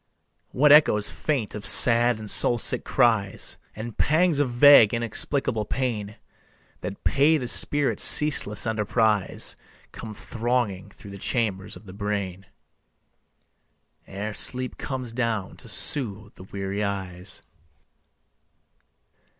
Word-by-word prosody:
What 145 +3 +2
echoes 145 -9 +4
faint 135 -9 -4
of 105 - -8
sad 120 0 +5
and 110 0 -10
soul 120 +3 +2
sick - - -2
cries, 110 -6 -1 0.2
And 110 +1 -8
pangs 160 +1 +1
of 145 -3 0
vague 120 -3 +5
inexplicable 115 0 -1
pain 105 -5 -4 0.6
That - - -9
pay 155 +3 +2
the 125 -4 -6
spirit's 145 +3 +1
ceaseless 120 -9 +4
enterprise, 110 -2 -1 0.4
Come 110 -1 -10
thronging 115 -5 -4
through 100 0 -15
the 100 - -11
chambers 105 -3 -3
of - - -15
the 95 - -12
brain 100 -2 -5 1.6
Ere 100 +2 -7
sleep 125 +4 +1
comes 130 -4 -5
down 115 -5 -4
to - - -12
soothe 110 -7 +1
the 95 - -15
weary 100 +1 -5
eyes. 95 -2 -7
110 Hz, 120 wpm, -23 LUFS, 100-125 Hz, 1.6 s, sad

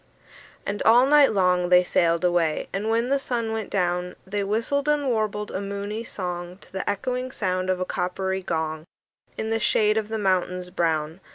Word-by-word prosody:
And 205 +1 -3
all 240 +3 +6
night 290 0 +6
long 180 -3 +2
they 180 0 +6
sailed 170 0 +2
away; 175 -3 +1
And 205 +3 -2
when 230 +2 +1
the 280 0 +2
sun 235 -4 -2
went 220 -2 -3
down, 180 -1 -1
They 200 +1 -2
whistled 230 +8 0
and 295 -1 +2
warbled 215 -3 -1
a 190 - -3
moony 200 +2 -4
song 180 -4 -5
To - - -17
the 190 - -2
echoing 250 +5 -2
sound 185 -5 -1
of 185 -1 +1
a 185 - -1
coppery 190 +1 -2
gong, 160 -3 -3 0.5
In 220 0 -3
the 225 - +1
shade 215 0 +2
of 215 -1 -1
the 220 - -2
mountains 180 -2 0
brown. 160 -2 -1
195 Hz, 185 wpm, -25 LUFS, 180-225 Hz, 0.5 s, all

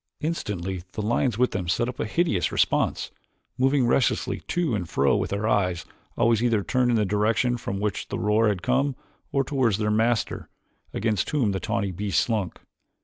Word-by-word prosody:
Instantly 95 - -3
the - - -3
lions 120 +1 +1
with 125 +1 +2
them 95 -4 -3
set 120 +6 +1
up 125 0 -6
a - - 0
hideous 110 - +1
response, - - +1 0.4
moving 135 +1 +2
restlessly 120 +1 +1
to 175 -7 0
and 90 -6 -2
fro 70 +1 +2
with - - -1
their 100 +2 -1
eyes 90 -5 +1 0.3
always 115 -2 +3
either 115 -4 +2
turned 125 +1 +1
in 120 - +3
the 105 - +2
direction 105 +5 +1
from 100 -4 -4
which 105 -1 -2
the - - -4
roar 105 +2 +2
had 100 -4 -1
come 140 -1 +1 0.4
or 135 - +2
toward 130 -6 +1
their 105 +1 0
masters, 115 +1 0 0.5
against 105 -4 -1
whom 130 -9 +1
the 95 - -2
tawny 100 0 -1
beasts 95 -1 0
slunk. 105 -6 -2
110 Hz, 185 wpm, -25 LUFS, 100-125 Hz, 0.5 s, always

